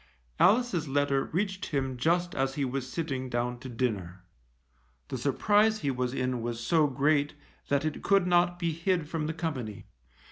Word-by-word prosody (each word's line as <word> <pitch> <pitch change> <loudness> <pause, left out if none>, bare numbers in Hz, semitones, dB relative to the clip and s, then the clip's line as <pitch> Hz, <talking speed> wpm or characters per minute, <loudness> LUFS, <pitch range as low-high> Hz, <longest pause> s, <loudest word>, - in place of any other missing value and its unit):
Alice's 200 -6 +3
letter 140 0 +1
reached 190 +2 -2
him 135 -3 -1
just 175 +7 +1
as 135 0 -1
he 140 - 0
was 130 0 -4
sitting 135 -6 -3
down 120 0 -2
to 130 - -8
dinner. 100 -7 -3 0.9
The 130 - -3
surprise 210 - +2
he 140 - 0
was 125 -1 -1
in 130 -2 -1
was 120 0 -3
so 150 +6 +3
great 145 +2 +1 0.3
that 140 +1 +1
it 155 - -3
could 195 -2 +3
not 175 0 +3
be 170 -2 -1
hid 170 0 0
from 155 -1 -2
the 160 - -2
company. 130 -11 -4
145 Hz, 170 wpm, -29 LUFS, 130-170 Hz, 0.9 s, Alice's